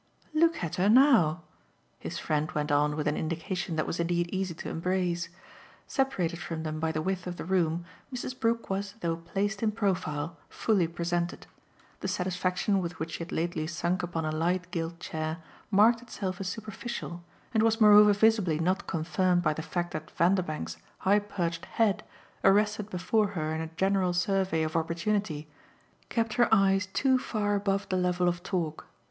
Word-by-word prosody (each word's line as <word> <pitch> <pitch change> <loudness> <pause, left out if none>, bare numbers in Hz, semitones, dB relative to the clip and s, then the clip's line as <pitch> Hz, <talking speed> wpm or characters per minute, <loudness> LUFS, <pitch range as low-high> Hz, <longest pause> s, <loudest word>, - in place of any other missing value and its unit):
"Look 330 - +3
at 170 +2 -3
her 190 +3 +3
now," 220 - +5 0.6
his - - -5
friend 155 0 -1
went 150 0 -1
on 150 +1 +3
with 150 -1 -2
an 150 - +1
indication 170 +2 -3
that 155 - 0
was 170 - -3
indeed 170 0 0
easy 190 -3 -2
to - - -7
embrace. 175 0 -1 0.6
Separated 185 - 0
from 165 -2 -4
them 155 -1 -3
by 160 0 0
the 155 0 -2
width 185 0 -2
of 180 - -4
the - - -5
room, 170 -2 +1 0.3
Mrs. 255 0 -5
Brook 230 0 +1
was, 195 +1 -3
though 165 -1 0
placed 195 +5 -2
in 220 -2 +2
profile, 170 -7 -1
fully 200 -7 +1
presented; 170 +1 -2 0.5
the - - -3
satisfaction 185 +2 0
with 170 -1 -5
which 160 +1 -4
she - - -5
had 170 0 -6
lately 160 -2 -1
sunk 170 +2 -1
upon 170 -2 -3
a 155 - -1
light 175 +3 -1
gilt 165 0 -3
chair 155 -1 -3 0.3
marked 220 +3 +5
itself 195 -6 -5
as 190 - -3
superficial 215 -4 -6 0.3
and 220 - +3
was 225 0 +3
moreover 210 -1 +8
visibly 205 -6 +3
not 185 +5 0
confirmed 175 +2 +1
by 155 -2 +2
the 160 - -5
fact 175 +2 -3
that 155 +1 -5
Vanderbank's 165 - 0 0.2
high 200 +2 +3
perched 175 -5 -3
head, 220 -4 +1 0.4
arrested 210 +1 +3
before 205 +3 +1
her 155 0 -1
in 160 - -2
a 160 - -3
general 190 -2 +2
survey 185 -2 +1
of 155 +1 -3
opportunity, 170 -1 -1 0.6
kept 225 -2 0
her 240 -1 +3
eyes 195 -2 +4
too 260 +7 +2
far 210 -4 -1
above 200 0 0
the 185 - +1
level 180 0 +1
of 175 0 0
talk. 175 -5 -3
180 Hz, 175 wpm, -29 LUFS, 165-205 Hz, 0.6 s, moreover